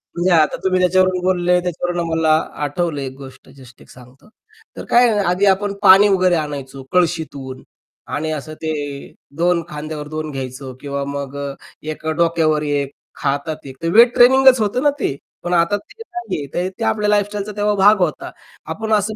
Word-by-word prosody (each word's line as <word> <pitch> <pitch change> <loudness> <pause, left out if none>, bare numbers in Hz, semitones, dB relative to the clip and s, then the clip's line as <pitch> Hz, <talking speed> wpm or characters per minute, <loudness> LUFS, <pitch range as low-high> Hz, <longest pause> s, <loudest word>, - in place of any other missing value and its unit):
म्हणजे 175 +2 +1
आता 160 -3 +4
तुम्ही 185 -1 +1
त्याच्यावरून 185 0 +3
बोलले 180 -1 +2
त्याच्यावरून 175 0 -3
आम्हाला 160 -2 +1 0.3
आठवलं 145 0 -2
एक 130 -1 -5
गोष्ट 135 -1 -13
जस्ट 125 -3 -16
एक - - -18
सांगतो. 125 - -17 0.5
तर - - -7
काय 245 +1 +5
आहे 210 - +1
आधी 180 +3 +2
आपण 200 +1 +2
पाणी 195 +2 +8
वगैरे 185 -2 +3
आणायचो 140 -4 -5
कळशीतून 150 -7 -1 0.5
आणि 155 +2 -2
असं 155 +1 -5
ते 160 -1 -2 0.6
2 175 0 +2
खांद्यावर 150 -1 -6
2 155 0 -5
घ्यायचो 130 0 -6
किंवा 140 -1 -3
मग 140 -1 -5
अ, 140 -1 -4 0.3
1 155 +1 -7
डोक्यावर 160 -1 +1
1, 145 -2 -1 0.3
हातात 145 +2 -2
1 130 0 -10
तर 165 - 0
वेट 235 +2 +7
ट्रेनिंगच 260 0 +6
होतं 215 +6 0
ना 290 - +5
ते. 140 - -1 0.3
पण 175 - -2
आता 175 +4 +2
ते 415 - -16
नाहीये 355 - -5
तर 180 +1 -1
ते - - -2
आपल्या 210 -1 +1
लाईफस्टाईलचा 205 0 0
तेव्हा 210 0 +1
भाग 200 +1 +5
होता. 180 - -1 0.3
आपण 220 0 -3
असं 210 +1 +1
170 Hz, 175 wpm, -19 LUFS, 145-200 Hz, 0.6 s, पाणी